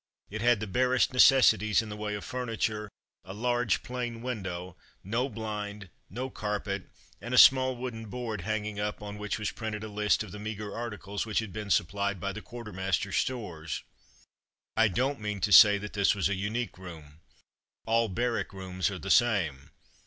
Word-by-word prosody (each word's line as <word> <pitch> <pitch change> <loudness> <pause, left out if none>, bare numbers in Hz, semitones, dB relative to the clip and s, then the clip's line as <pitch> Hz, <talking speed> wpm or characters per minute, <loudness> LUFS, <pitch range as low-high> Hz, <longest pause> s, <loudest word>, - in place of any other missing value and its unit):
It 110 +1 -4
had 120 -2 +4
the 110 - -3
barest 125 +6 +2
necessities 125 -5 +5
in 110 - -8
the 105 - -5
way 105 0 -3
of 105 - -6
furniture, 110 -4 -2 0.3
a 95 +1 -9
large 120 +1 +1
plain 120 -2 -4
window, 95 -7 -4 0.3
no 115 +7 -1
blind, 105 -3 -5 0.2
no 125 +7 -4
carpet, 105 -2 -3 0.3
and 120 +2 -3
a - - +2
small 130 0 +7
wooden 120 -3 -6
board 115 -3 -4
hanging 105 +1 -3
up 105 0 -3
on 105 0 -7
which 105 0 -2
was 105 - -2
printed 110 -2 -5
a - - -4
list 105 0 +1
of 105 - -10
the 105 - -8
meagre 105 -1 -5
articles 105 -3 -4
which 110 - -2
had 110 -5 -1
been 105 0 -5
supplied 100 +2 +1
by 100 +2 -3
the 110 - -7
quartermaster's 95 -4 -3
stores. 90 - -3 0.9
I 115 0 +5
don't 130 +7 0
meant 105 -3 -4
to 105 - +1
say 105 0 +9
this 100 0 +1
was 100 - +1
a - - 0
unique 100 +1 -3
room. 80 -5 -11 0.7
All 115 0 +2
barrack 120 +2 -1
rooms 95 -1 -2
are 100 - -5
the 95 +2 -3
same. 90 - +2
105 Hz, 175 wpm, -29 LUFS, 100-115 Hz, 0.9 s, say